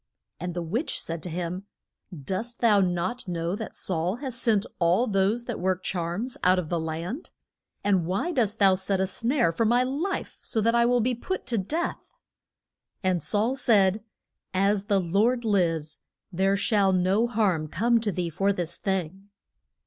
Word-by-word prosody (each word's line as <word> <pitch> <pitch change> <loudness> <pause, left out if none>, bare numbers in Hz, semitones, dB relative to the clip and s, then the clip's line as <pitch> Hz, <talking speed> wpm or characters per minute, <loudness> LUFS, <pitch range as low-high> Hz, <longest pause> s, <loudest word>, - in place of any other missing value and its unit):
And 175 +1 -4
the 175 - -2
witch 220 - -2
said 165 -1 -4
to 180 - -6
him, 180 +3 -4 0.6
Dost 220 - -4
thou 215 -4 +5
not 185 +6 -1
know 170 +1 -2
that 220 +1 -7
Saul 180 +1 -1
has 260 0 -5
sent 225 -4 +2
all 180 +7 +3
those 210 +3 +1
that 240 -3 -4
work 185 0 0
charms 180 +8 -3
out 185 +1 +5
of 175 -4 -2
the 170 - 0
land? 165 - -4 0.5
And 190 -5 +2
why 195 - -1
dost 230 - +1
thou 195 -2 +5
set 190 +1 0
a 190 - +2
snare 230 - +1
for 170 - 0
my 240 +3 +3
life, 295 +10 -3
so 225 - -2
that 230 +2 +2
I 235 0 +4
will 245 0 +3
be 250 +3 +1
put 375 +11 -4
to 240 -2 -1
death? 320 - -3 0.9
And 185 -2 +1
Saul 220 - 0
said, 210 -5 +3 0.5
As 195 +1 +2
the 200 -2 +2
Lord 215 +8 +1
lives 165 -7 0 0.3
there 195 +2 +2
shall 200 -1 +2
no 190 +5 +2
harm 200 -9 +1
come 230 +9 +2
to 220 -2 -1
thee 175 -2 -2
for 195 +5 +1
this 175 -3 -3
thing. 190 0 -3
195 Hz, 175 wpm, -26 LUFS, 180-230 Hz, 0.9 s, thou